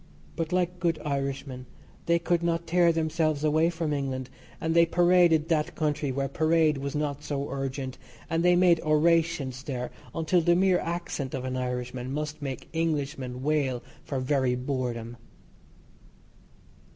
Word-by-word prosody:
But, 165 0 -3
like 180 0 0
good 170 -2 +1
Irishmen, 135 -2 -3 0.4
they 170 0 +4
could 170 0 0
not 170 0 0
tear 170 0 +4
themselves 160 -2 0
away 155 +2 +3
from 165 -3 -2
England, 135 -2 -3 0.3
and 160 0 -1
they 170 - +7
paraded 175 -2 +4
that 155 -2 0
country 150 -3 -1
where 135 +1 -1
parade 155 +1 +2
was 140 +1 -4
not 150 -1 -2
so 140 -1 -3
urgent, 135 -1 -4 0.3
and 165 0 0
they 180 0 +5
made 175 -2 +5
orations 155 -4 +2
there 130 -3 -4 0.2
until 165 +2 +2
the 170 +1 +4
mere 185 0 +3
accent 165 -6 -3
of 130 -1 -4
an 130 0 -3
Irishman 125 0 -3
must 150 +1 -4
make 135 -2 -5
Englishmen 140 -6 -2
wail 140 -5 0 0.2
for 135 - -3
very 130 -1 +1
boredom. 125 -3 -3
150 Hz, 150 wpm, -27 LUFS, 135-165 Hz, 0.4 s, they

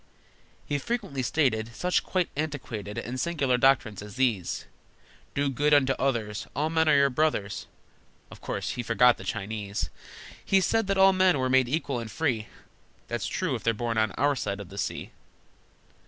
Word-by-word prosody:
He 145 - -1
frequently 195 - -3
stated 115 -4 0
Such 180 0 +1
quite 185 -2 0
antiquated 130 -9 -4
And 125 +3 -4
singular 135 -6 +1
doctrines 120 -7 +3
as 105 -1 -10
these: 115 -9 0 0.7
"Do 140 0 +1
good 145 +3 +3
unto 135 -2 +4
others! 115 -6 -1
All 155 +2 0
men 160 -1 +2
are 150 - +6
your 140 -1 +4
brothers!" 125 -8 0 0.6
(Of - - -12
course 100 +2 -3
he 125 - -3
forgot 120 +1 +4
the - - -8
Chinese!) 100 +1 -4 0.5
He 195 - +3
said 225 +2 +1
that 195 0 +1
all 190 0 +7
men 185 -3 +4
were 130 -1 0
made 130 -2 +4
equal 140 -3 -1
and 115 -1 -6
free, 120 -6 -1 0.6
(That's 120 0 -2
true 185 -7 -1
if 120 - -3
they're 115 -1 +1
born 115 0 -1
on 110 -2 +2
our 145 +2 +2
side 100 -5 -3
of 100 -4 -8
the 100 - -7
sea!) - - -3
130 Hz, 175 wpm, -27 LUFS, 110-150 Hz, 0.7 s, all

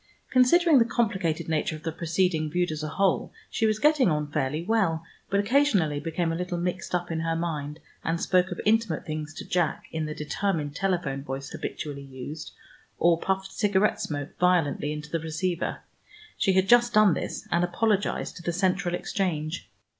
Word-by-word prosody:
Considering 290 +4 +5
the - - +6
complicated 200 -9 0
nature 160 0 0
of 155 - -11
the 165 - -2
proceeding 165 -1 0
viewed 175 +1 0
as 155 -1 -4
a 155 - -3
whole, 195 +3 +1 0.2
she 225 - +1
was 215 0 +1
getting 295 -3 +4
on 150 -1 0
fairly 150 +2 -1
well, 185 -6 +1 0.3
but 200 - +2
occasionally 200 - +2
became 165 +2 -1
a - - -1
little 180 0 -3
mixed 180 +1 -2
up 175 -1 -2
in 160 - -1
her 165 0 0
mind, 155 -3 -3 0.2
and 165 +1 0
spoke 185 +1 +2
of 180 - -5
intimate 215 -6 +2
things 155 0 -4
to - - -8
Jack 175 -4 0
in 160 -1 -2
the 150 - -5
determined 150 -2 -2
telephone 170 -8 -1
voice 135 0 -5
habitually 145 -2 -5
used, 140 +3 -8 0.5
or 170 -1 +4
puffed 190 +1 -1
cigarette 205 0 +2
smoke 145 -2 -4
violently 170 -5 +2
into 150 0 -6
the 165 - 0
receiver. 160 +2 -2 0.5
She 190 - +2
had 190 0 +3
just 240 0 +5
done 215 -4 +6
this - - -4
and 170 +1 +3
apologized 200 +3 0
to - - -9
the 175 0 -2
Central 185 0 +1
exchange. 165 -4 -2
175 Hz, 180 wpm, -27 LUFS, 155-195 Hz, 0.5 s, the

